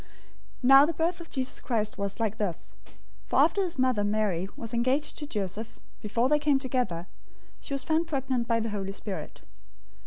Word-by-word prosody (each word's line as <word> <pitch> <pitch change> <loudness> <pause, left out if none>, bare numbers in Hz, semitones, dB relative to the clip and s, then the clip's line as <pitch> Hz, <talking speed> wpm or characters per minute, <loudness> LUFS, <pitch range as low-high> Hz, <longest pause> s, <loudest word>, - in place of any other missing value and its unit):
001:018 - - -23 0.6
Now 270 +2 +9
the 335 - -1
birth 340 +3 0
of 335 - -11
Jesus 260 -1 -2
Christ 215 -4 -1
was 200 +1 -3
like 220 -1 0
this; 195 -7 -3 0.5
for - - 0
after 400 - +4
his 360 -6 -2
mother, 255 -5 +2
Mary, 205 -4 0
was 230 0 -6
engaged 255 +5 +1
to 295 - -5
Joseph, 210 - -4 0.2
before 230 +4 +1
they 300 +2 +3
came 290 -2 +3
together, 250 -10 -1 0.5
she 280 - -4
was 270 - -3
found 320 +1 +1
pregnant 265 -5 -1
by 230 -1 +2
the 225 0 -2
Holy 195 -2 -3
Spirit. 200 -1 -6
240 Hz, 185 wpm, -28 LUFS, 210-275 Hz, 0.6 s, Now